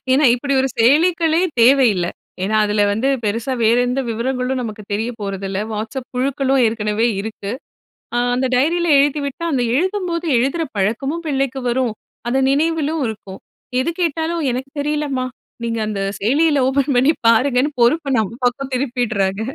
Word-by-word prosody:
ஏன்னா 285 Hz, +3 st, +3 dB
இப்படி 275 Hz, +3 st, -3 dB
ஒரு 270 Hz, -, +1 dB
செயலிக்களே 325 Hz, +6 st, +3 dB, 0.2 s
தேவயில்ல. 235 Hz, -8 st, +4 dB, 0.4 s
ஏன்னா 210 Hz, +3 st, 0 dB
அதுல 210 Hz, 0 st, +1 dB
வந்து 225 Hz, +6 st, 0 dB, 0.2 s
பெருசா 230 Hz, +5 st, -1 dB
வேற 225 Hz, +2 st, +4 dB
எந்த 250 Hz, +2 st, 0 dB
விவரங்களும் 250 Hz, +2 st, -2 dB
நமக்கு 215 Hz, -2 st, -6 dB
தெரிய 220 Hz, +4 st, -1 dB
போறதில்ல. 195 Hz, -1 st, -4 dB
Whatsapp 220 Hz, +4 st, -4 dB
குழுக்களும் 270 Hz, +1 st, +1 dB
ஏற்கனவே 220 Hz, 0 st, 0 dB
இருக்கு. 205 Hz, -1 st, -6 dB, 0.7 s
அ -, -, +2 dB, 0.2 s
அந்த 260 Hz, -, 0 dB
டைரியில 335 Hz, +7 st, +1 dB
எழுதிவிட்டா 285 Hz, +2 st, 0 dB
அந்த 260 Hz, -4 st, +1 dB
எழுதும்போது, 360 Hz, 0 st, -1 dB
எழுதுற 275 Hz, +7 st, 0 dB
பழக்கமும் 270 Hz, -, -1 dB
பிள்ளைக்கு 270 Hz, -2 st, -1 dB
வரும், 245 Hz, -2 st, 0 dB, 0.4 s
அது 265 Hz, +2 st, +1 dB
நினைவிலும் 315 Hz, +1 st, 0 dB
இருக்கும். 205 Hz, -3 st, -8 dB, 0.4 s
எது 315 Hz, -, -1 dB
கேட்டாலும் 330 Hz, 0 st, -1 dB
"எனக்கு 260 Hz, +3 st, -5 dB
தெரியலம்மா. 290 Hz, -3 st, -1 dB, 0.4 s
நீங்க 230 Hz, -1 st, -2 dB
அந்த 205 Hz, -2 st, -3 dB, 0.2 s
செயலியில 290 Hz, +7 st, +2 dB
ஓப்பன் 275 Hz, +1 st, +1 dB
பண்ணி 265 Hz, +6 st, +4 dB, 0.2 s
பாருங்கன்னு" 255 Hz, +4 st, +3 dB
பொறுப்பை 275 Hz, +3 st, +2 dB
நம்ம 220 Hz, 0 st, -2 dB
பக்கம் 265 Hz, +2 st, -1 dB
திருப்பிட்றாங்க. 235 Hz, -7 st, -1 dB
260 Hz, 140 wpm, -19 LUFS, 225-290 Hz, 0.7 s, தேவயில்ல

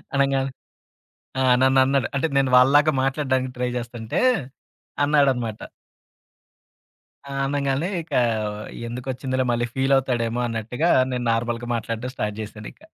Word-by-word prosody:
అనంగాల్నే 135 Hz, -1 st, +1 dB, 0.9 s
ఆ! -, -, +2 dB, 0.2 s
నన్నన్నాడు 130 Hz, 0 st, +3 dB
అంటే 145 Hz, +4 st, +1 dB
నేను 135 Hz, -1 st, +3 dB
వాళ్ళలాగా 145 Hz, +5 st, +5 dB
మాట్లాడ్డానికి 130 Hz, -1 st, 0 dB
ట్రై 125 Hz, 0 st, -1 dB
జేస్తంటే 120 Hz, -2 st, -3 dB, 0.8 s
అన్నాడన్నమాట. 135 Hz, -7 st, +1 dB, 1.7 s
ఆ! -, -, -4 dB
అనంగాలనే 140 Hz, +3 st, 0 dB
ఇక 160 Hz, -, -19 dB, 0.8 s
ఎందుకొచ్చిందిలే 130 Hz, +2 st, -3 dB
మళ్ళీ 120 Hz, 0 st, 0 dB
ఫీలవుతాడేమో 130 Hz, -3 st, +1 dB
అన్నట్టుగా 115 Hz, +8 st, -1 dB, 0.2 s
నేను 125 Hz, -1 st, -2 dB
నార్మల్‌గా 120 Hz, +1 st, -2 dB
మాట్లాడ్డం 115 Hz, +2 st, -4 dB
స్టార్ట్ 105 Hz, -1 st, -2 dB
జేశానింక. 105 Hz, 0 st, -9 dB
130 Hz, 100 wpm, -23 LUFS, 120-135 Hz, 1.7 s, వాళ్ళలాగా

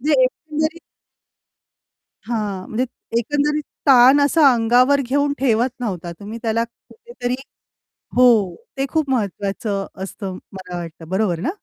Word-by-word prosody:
म्हणजे 285 Hz, 0 st, +3 dB
एकंदरीत 310 Hz, +5 st, -1 dB, 1.5 s
हां, 210 Hz, -5 st, -3 dB
म्हणजे 245 Hz, +4 st, -1 dB
त 245 Hz, -, -19 dB, 0.3 s
एकंदरीत 295 Hz, +5 st, 0 dB, 0.2 s
ताण 265 Hz, +1 st, +7 dB
असा 285 Hz, -1 st, +5 dB
अंगावर 250 Hz, +5 st, +4 dB
घेऊन 285 Hz, +3 st, 0 dB
ठेवत 245 Hz, -1 st, +2 dB
नव्हता, 180 Hz, -8 st, -4 dB
तुम्ही 215 Hz, +3 st, -7 dB
त्याला 230 Hz, 0 st, 0 dB
कुठेतरी 245 Hz, -, -6 dB, 0.8 s
हो, 220 Hz, -8 st, +5 dB, 0.2 s
ते 270 Hz, -, 0 dB
खूप 315 Hz, -4 st, 0 dB
महत्वाचं 200 Hz, -2 st, -2 dB, 0.2 s
असतं 190 Hz, -1 st, -6 dB, 0.2 s
मला 185 Hz, -2 st, -7 dB
वाटतं, 165 Hz, -1 st, -8 dB
बरोबर 190 Hz, -3 st, 0 dB
ना? 185 Hz, -, -1 dB
240 Hz, 125 wpm, -20 LUFS, 200-280 Hz, 1.5 s, ताण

